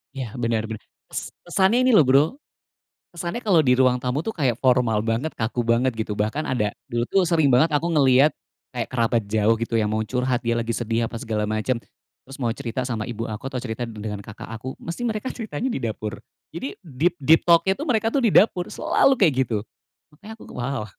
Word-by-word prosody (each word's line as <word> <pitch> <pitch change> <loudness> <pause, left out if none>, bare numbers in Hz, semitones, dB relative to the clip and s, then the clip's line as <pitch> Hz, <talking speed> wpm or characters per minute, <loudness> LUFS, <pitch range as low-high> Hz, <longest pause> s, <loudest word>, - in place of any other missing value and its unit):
Iya 130 -4 -4
bener 115 -2 0
bener. 110 -1 -6 0.3
Kes - - -5
kesannya 190 +7 +3
ini 255 - +3
loh 170 - +6
Bro, 135 +2 +6 0.9
kesannya 175 +8 -5
kalo 190 -7 +5
di 130 -5 +3
ruang 125 -1 +3
tamu 125 +5 -2
tuh 225 - -2
kayak 130 - 0
formal 120 -5 +2
banget, 115 +8 -1
kaku 110 +2 -2
banget 120 +2 +2
gitu, 110 -2 -4
bahkan 110 +9 -1
ada 105 -5 0 0.2
dulu 120 0 -1
tuh 195 - +2
sering 160 -6 +3
banget 130 +7 +5
aku 160 - -1
ngeliat, 140 -1 +5 0.4
kayak 120 -2 -3
kerabat 115 -2 +1
jauh 110 +1 +3
gitu 115 0 -1
yang 105 -1 +1
mau 110 - 0
curhat 125 +2 -1
dia 115 -2 0
lagi 115 0 -1
sedih 115 0 -1
apa 115 0 -5
segala 110 -4 -2
macem. 110 +4 -1 0.5
Terus 135 +1 -11
mau - - +2
cerita 125 -2 -4
sama 110 -4 -2
ibu 115 -1 -4
aku 110 +2 -6
atau - - -3
cerita 120 0 -4
dengan 105 -2 -6
kakak 110 - -10
aku, 115 +4 -6
mesti 170 +7 -6
mereka 220 +1 -2
ceritanya 225 - -3
di - - -3
dapur. 110 -1 -4 0.4
Jadi 215 - -5
deep 165 0 0
deep 160 +4 +5
talk-nya 170 +2 +5
tuh 295 - -4
mereka 225 -3 +2
tuh 280 - +2
di 220 - +3
dapur, 180 -4 +4
selalu 275 - +3
kayak 175 -7 +5
gitu. 110 -4 -2 0.6
Makanya 210 +7 -11
aku, - - -14
wow. 125 -1 -2
125 Hz, 205 wpm, -23 LUFS, 115-165 Hz, 0.9 s, loh